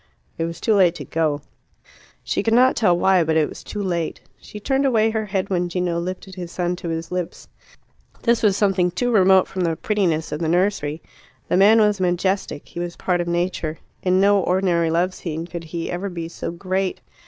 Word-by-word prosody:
It 165 Hz, -, +1 dB
was 170 Hz, 0 st, -6 dB
too 220 Hz, -, +2 dB
late 180 Hz, -4 st, +4 dB
to 145 Hz, -4 st, -7 dB
go. 155 Hz, 0 st, -1 dB, 0.8 s
She -, -, -1 dB
could 225 Hz, 0 st, +2 dB
not 255 Hz, +2 st, +5 dB
tell 180 Hz, -6 st, +3 dB
why, 185 Hz, -1 st, +4 dB
but 160 Hz, 0 st, +1 dB
it 155 Hz, -2 st, +3 dB
was -, -, -10 dB
too 205 Hz, -, -5 dB
late. 170 Hz, -4 st, -2 dB, 0.2 s
She 210 Hz, -, -10 dB
turned 270 Hz, +6 st, 0 dB
away 225 Hz, -5 st, +3 dB
her 220 Hz, -1 st, -2 dB
head 195 Hz, 0 st, -2 dB
when 175 Hz, -1 st, 0 dB
Gino 175 Hz, -1 st, -1 dB
lifted 185 Hz, +2 st, -6 dB
his 175 Hz, -2 st, -7 dB
son 175 Hz, 0 st, -1 dB
to 175 Hz, -, -5 dB
his 165 Hz, +1 st, -4 dB
lips. 180 Hz, -2 st, -4 dB, 0.8 s
This 235 Hz, -1 st, +2 dB
was 205 Hz, -3 st, +3 dB
something 195 Hz, -3 st, +2 dB
too 245 Hz, +8 st, -1 dB
remote 190 Hz, -3 st, +5 dB
from 190 Hz, -, -4 dB
the 165 Hz, -2 st, +1 dB
prettiness 175 Hz, -6 st, 0 dB
of 150 Hz, -, -3 dB
the 165 Hz, -, -1 dB
nursery. 175 Hz, -4 st, 0 dB, 0.5 s
The -, -, +2 dB
man 210 Hz, +4 st, +6 dB
was 210 Hz, -2 st, +2 dB
majestic; 180 Hz, -3 st, -1 dB
he -, -, -7 dB
was 175 Hz, 0 st, -4 dB
a -, -, -30 dB
part 180 Hz, -2 st, 0 dB
of 175 Hz, -, -4 dB
Nature; 170 Hz, -2 st, -1 dB, 0.2 s
in 185 Hz, 0 st, +2 dB
no 200 Hz, +1 st, +4 dB
ordinary 180 Hz, -3 st, +1 dB
love 175 Hz, +3 st, +1 dB
scene 165 Hz, -2 st, -5 dB
could 170 Hz, -1 st, -7 dB
he 165 Hz, +1 st, -4 dB
ever 180 Hz, +3 st, -3 dB
be 170 Hz, -2 st, -5 dB
so 170 Hz, -, -6 dB
great. 185 Hz, +2 st, -2 dB
180 Hz, 210 wpm, -22 LUFS, 170-195 Hz, 0.8 s, man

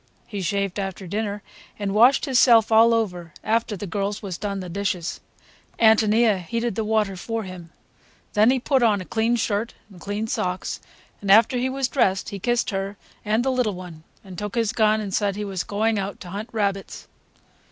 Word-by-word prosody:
He 205 Hz, -3 st, -5 dB
shaved 200 Hz, +1 st, -1 dB
after 195 Hz, 0 st, -4 dB
dinner, 205 Hz, +2 st, -3 dB, 0.3 s
and 200 Hz, -2 st, -2 dB
washed 245 Hz, +8 st, +5 dB
hisself 240 Hz, -5 st, +5 dB
all 225 Hz, +1 st, +6 dB
over 180 Hz, -8 st, -1 dB
after 225 Hz, -1 st, 0 dB
the 205 Hz, -, -5 dB
girls 200 Hz, +2 st, -3 dB
was 190 Hz, -3 st, -4 dB
done 200 Hz, +1 st, -4 dB
the 185 Hz, -, -6 dB
dishes. 180 Hz, -1 st, -3 dB, 0.6 s
Ántonia 220 Hz, -2 st, +4 dB
heated 230 Hz, +5 st, -2 dB
the 220 Hz, -, -2 dB
water 215 Hz, -2 st, 0 dB
for 225 Hz, +5 st, -4 dB
him. 185 Hz, -3 st, -9 dB, 0.6 s
Then 215 Hz, +2 st, +5 dB
he 260 Hz, 0 st, +3 dB
put 265 Hz, +1 st, +1 dB
on 215 Hz, -4 st, +3 dB
a 185 Hz, -, -7 dB
clean 225 Hz, +4 st, +1 dB
shirt 225 Hz, 0 st, -1 dB, 0.2 s
and 180 Hz, -3 st, -15 dB
clean 205 Hz, +2 st, -3 dB
socks, 185 Hz, -4 st, -3 dB, 0.4 s
and 200 Hz, -, -5 dB
after 220 Hz, +5 st, +6 dB
he 255 Hz, +1 st, 0 dB
was 265 Hz, 0 st, -1 dB
dressed 195 Hz, -9 st, +1 dB
he 200 Hz, -2 st, -6 dB
kissed 240 Hz, +4 st, 0 dB
her 195 Hz, +1 st, -3 dB, 0.3 s
and 220 Hz, +3 st, +1 dB
the 265 Hz, -, +2 dB
little 250 Hz, -6 st, 0 dB
one 180 Hz, -3 st, -10 dB, 0.2 s
and 190 Hz, -2 st, -9 dB
took 210 Hz, +1 st, -5 dB
his 225 Hz, -2 st, +1 dB
gun 215 Hz, -1 st, +3 dB
and 200 Hz, -2 st, -5 dB
said 200 Hz, -1 st, 0 dB
he 210 Hz, 0 st, -4 dB
was 190 Hz, -3 st, -3 dB
going 215 Hz, +1 st, 0 dB
out 195 Hz, +1 st, -4 dB
to 180 Hz, -, -9 dB
hunt 210 Hz, +4 st, -5 dB
rabbits. 200 Hz, -3 st, -3 dB
210 Hz, 195 wpm, -23 LUFS, 195-225 Hz, 0.6 s, all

